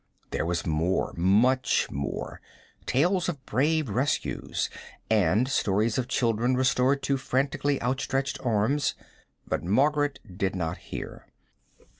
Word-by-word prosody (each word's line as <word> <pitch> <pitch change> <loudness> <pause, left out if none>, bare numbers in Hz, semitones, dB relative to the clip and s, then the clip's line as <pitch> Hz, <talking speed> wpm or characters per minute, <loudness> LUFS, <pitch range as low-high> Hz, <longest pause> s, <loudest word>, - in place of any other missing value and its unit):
There - - -1
was 85 0 -1
more 80 +3 0
much 110 +9 +3
more: 70 0 -4 0.5
tales 175 +6 +2
of 145 -6 -6
brave 150 +5 +1
rescues, 125 +7 -1 0.4
and 105 +3 +3
stories 110 -2 +1
of 125 - -2
children 120 0 +1
restored 130 +1 +2
to 140 0 +1
frantically 135 +2 0
outstretched 135 +2 -1
arms; 120 +5 +1 0.5
but - - -2
Margaret 145 - +2 0.2
did 95 -1 0
not 80 -3 -2
hear. - - -8
125 Hz, 115 wpm, -27 LUFS, 105-140 Hz, 0.5 s, much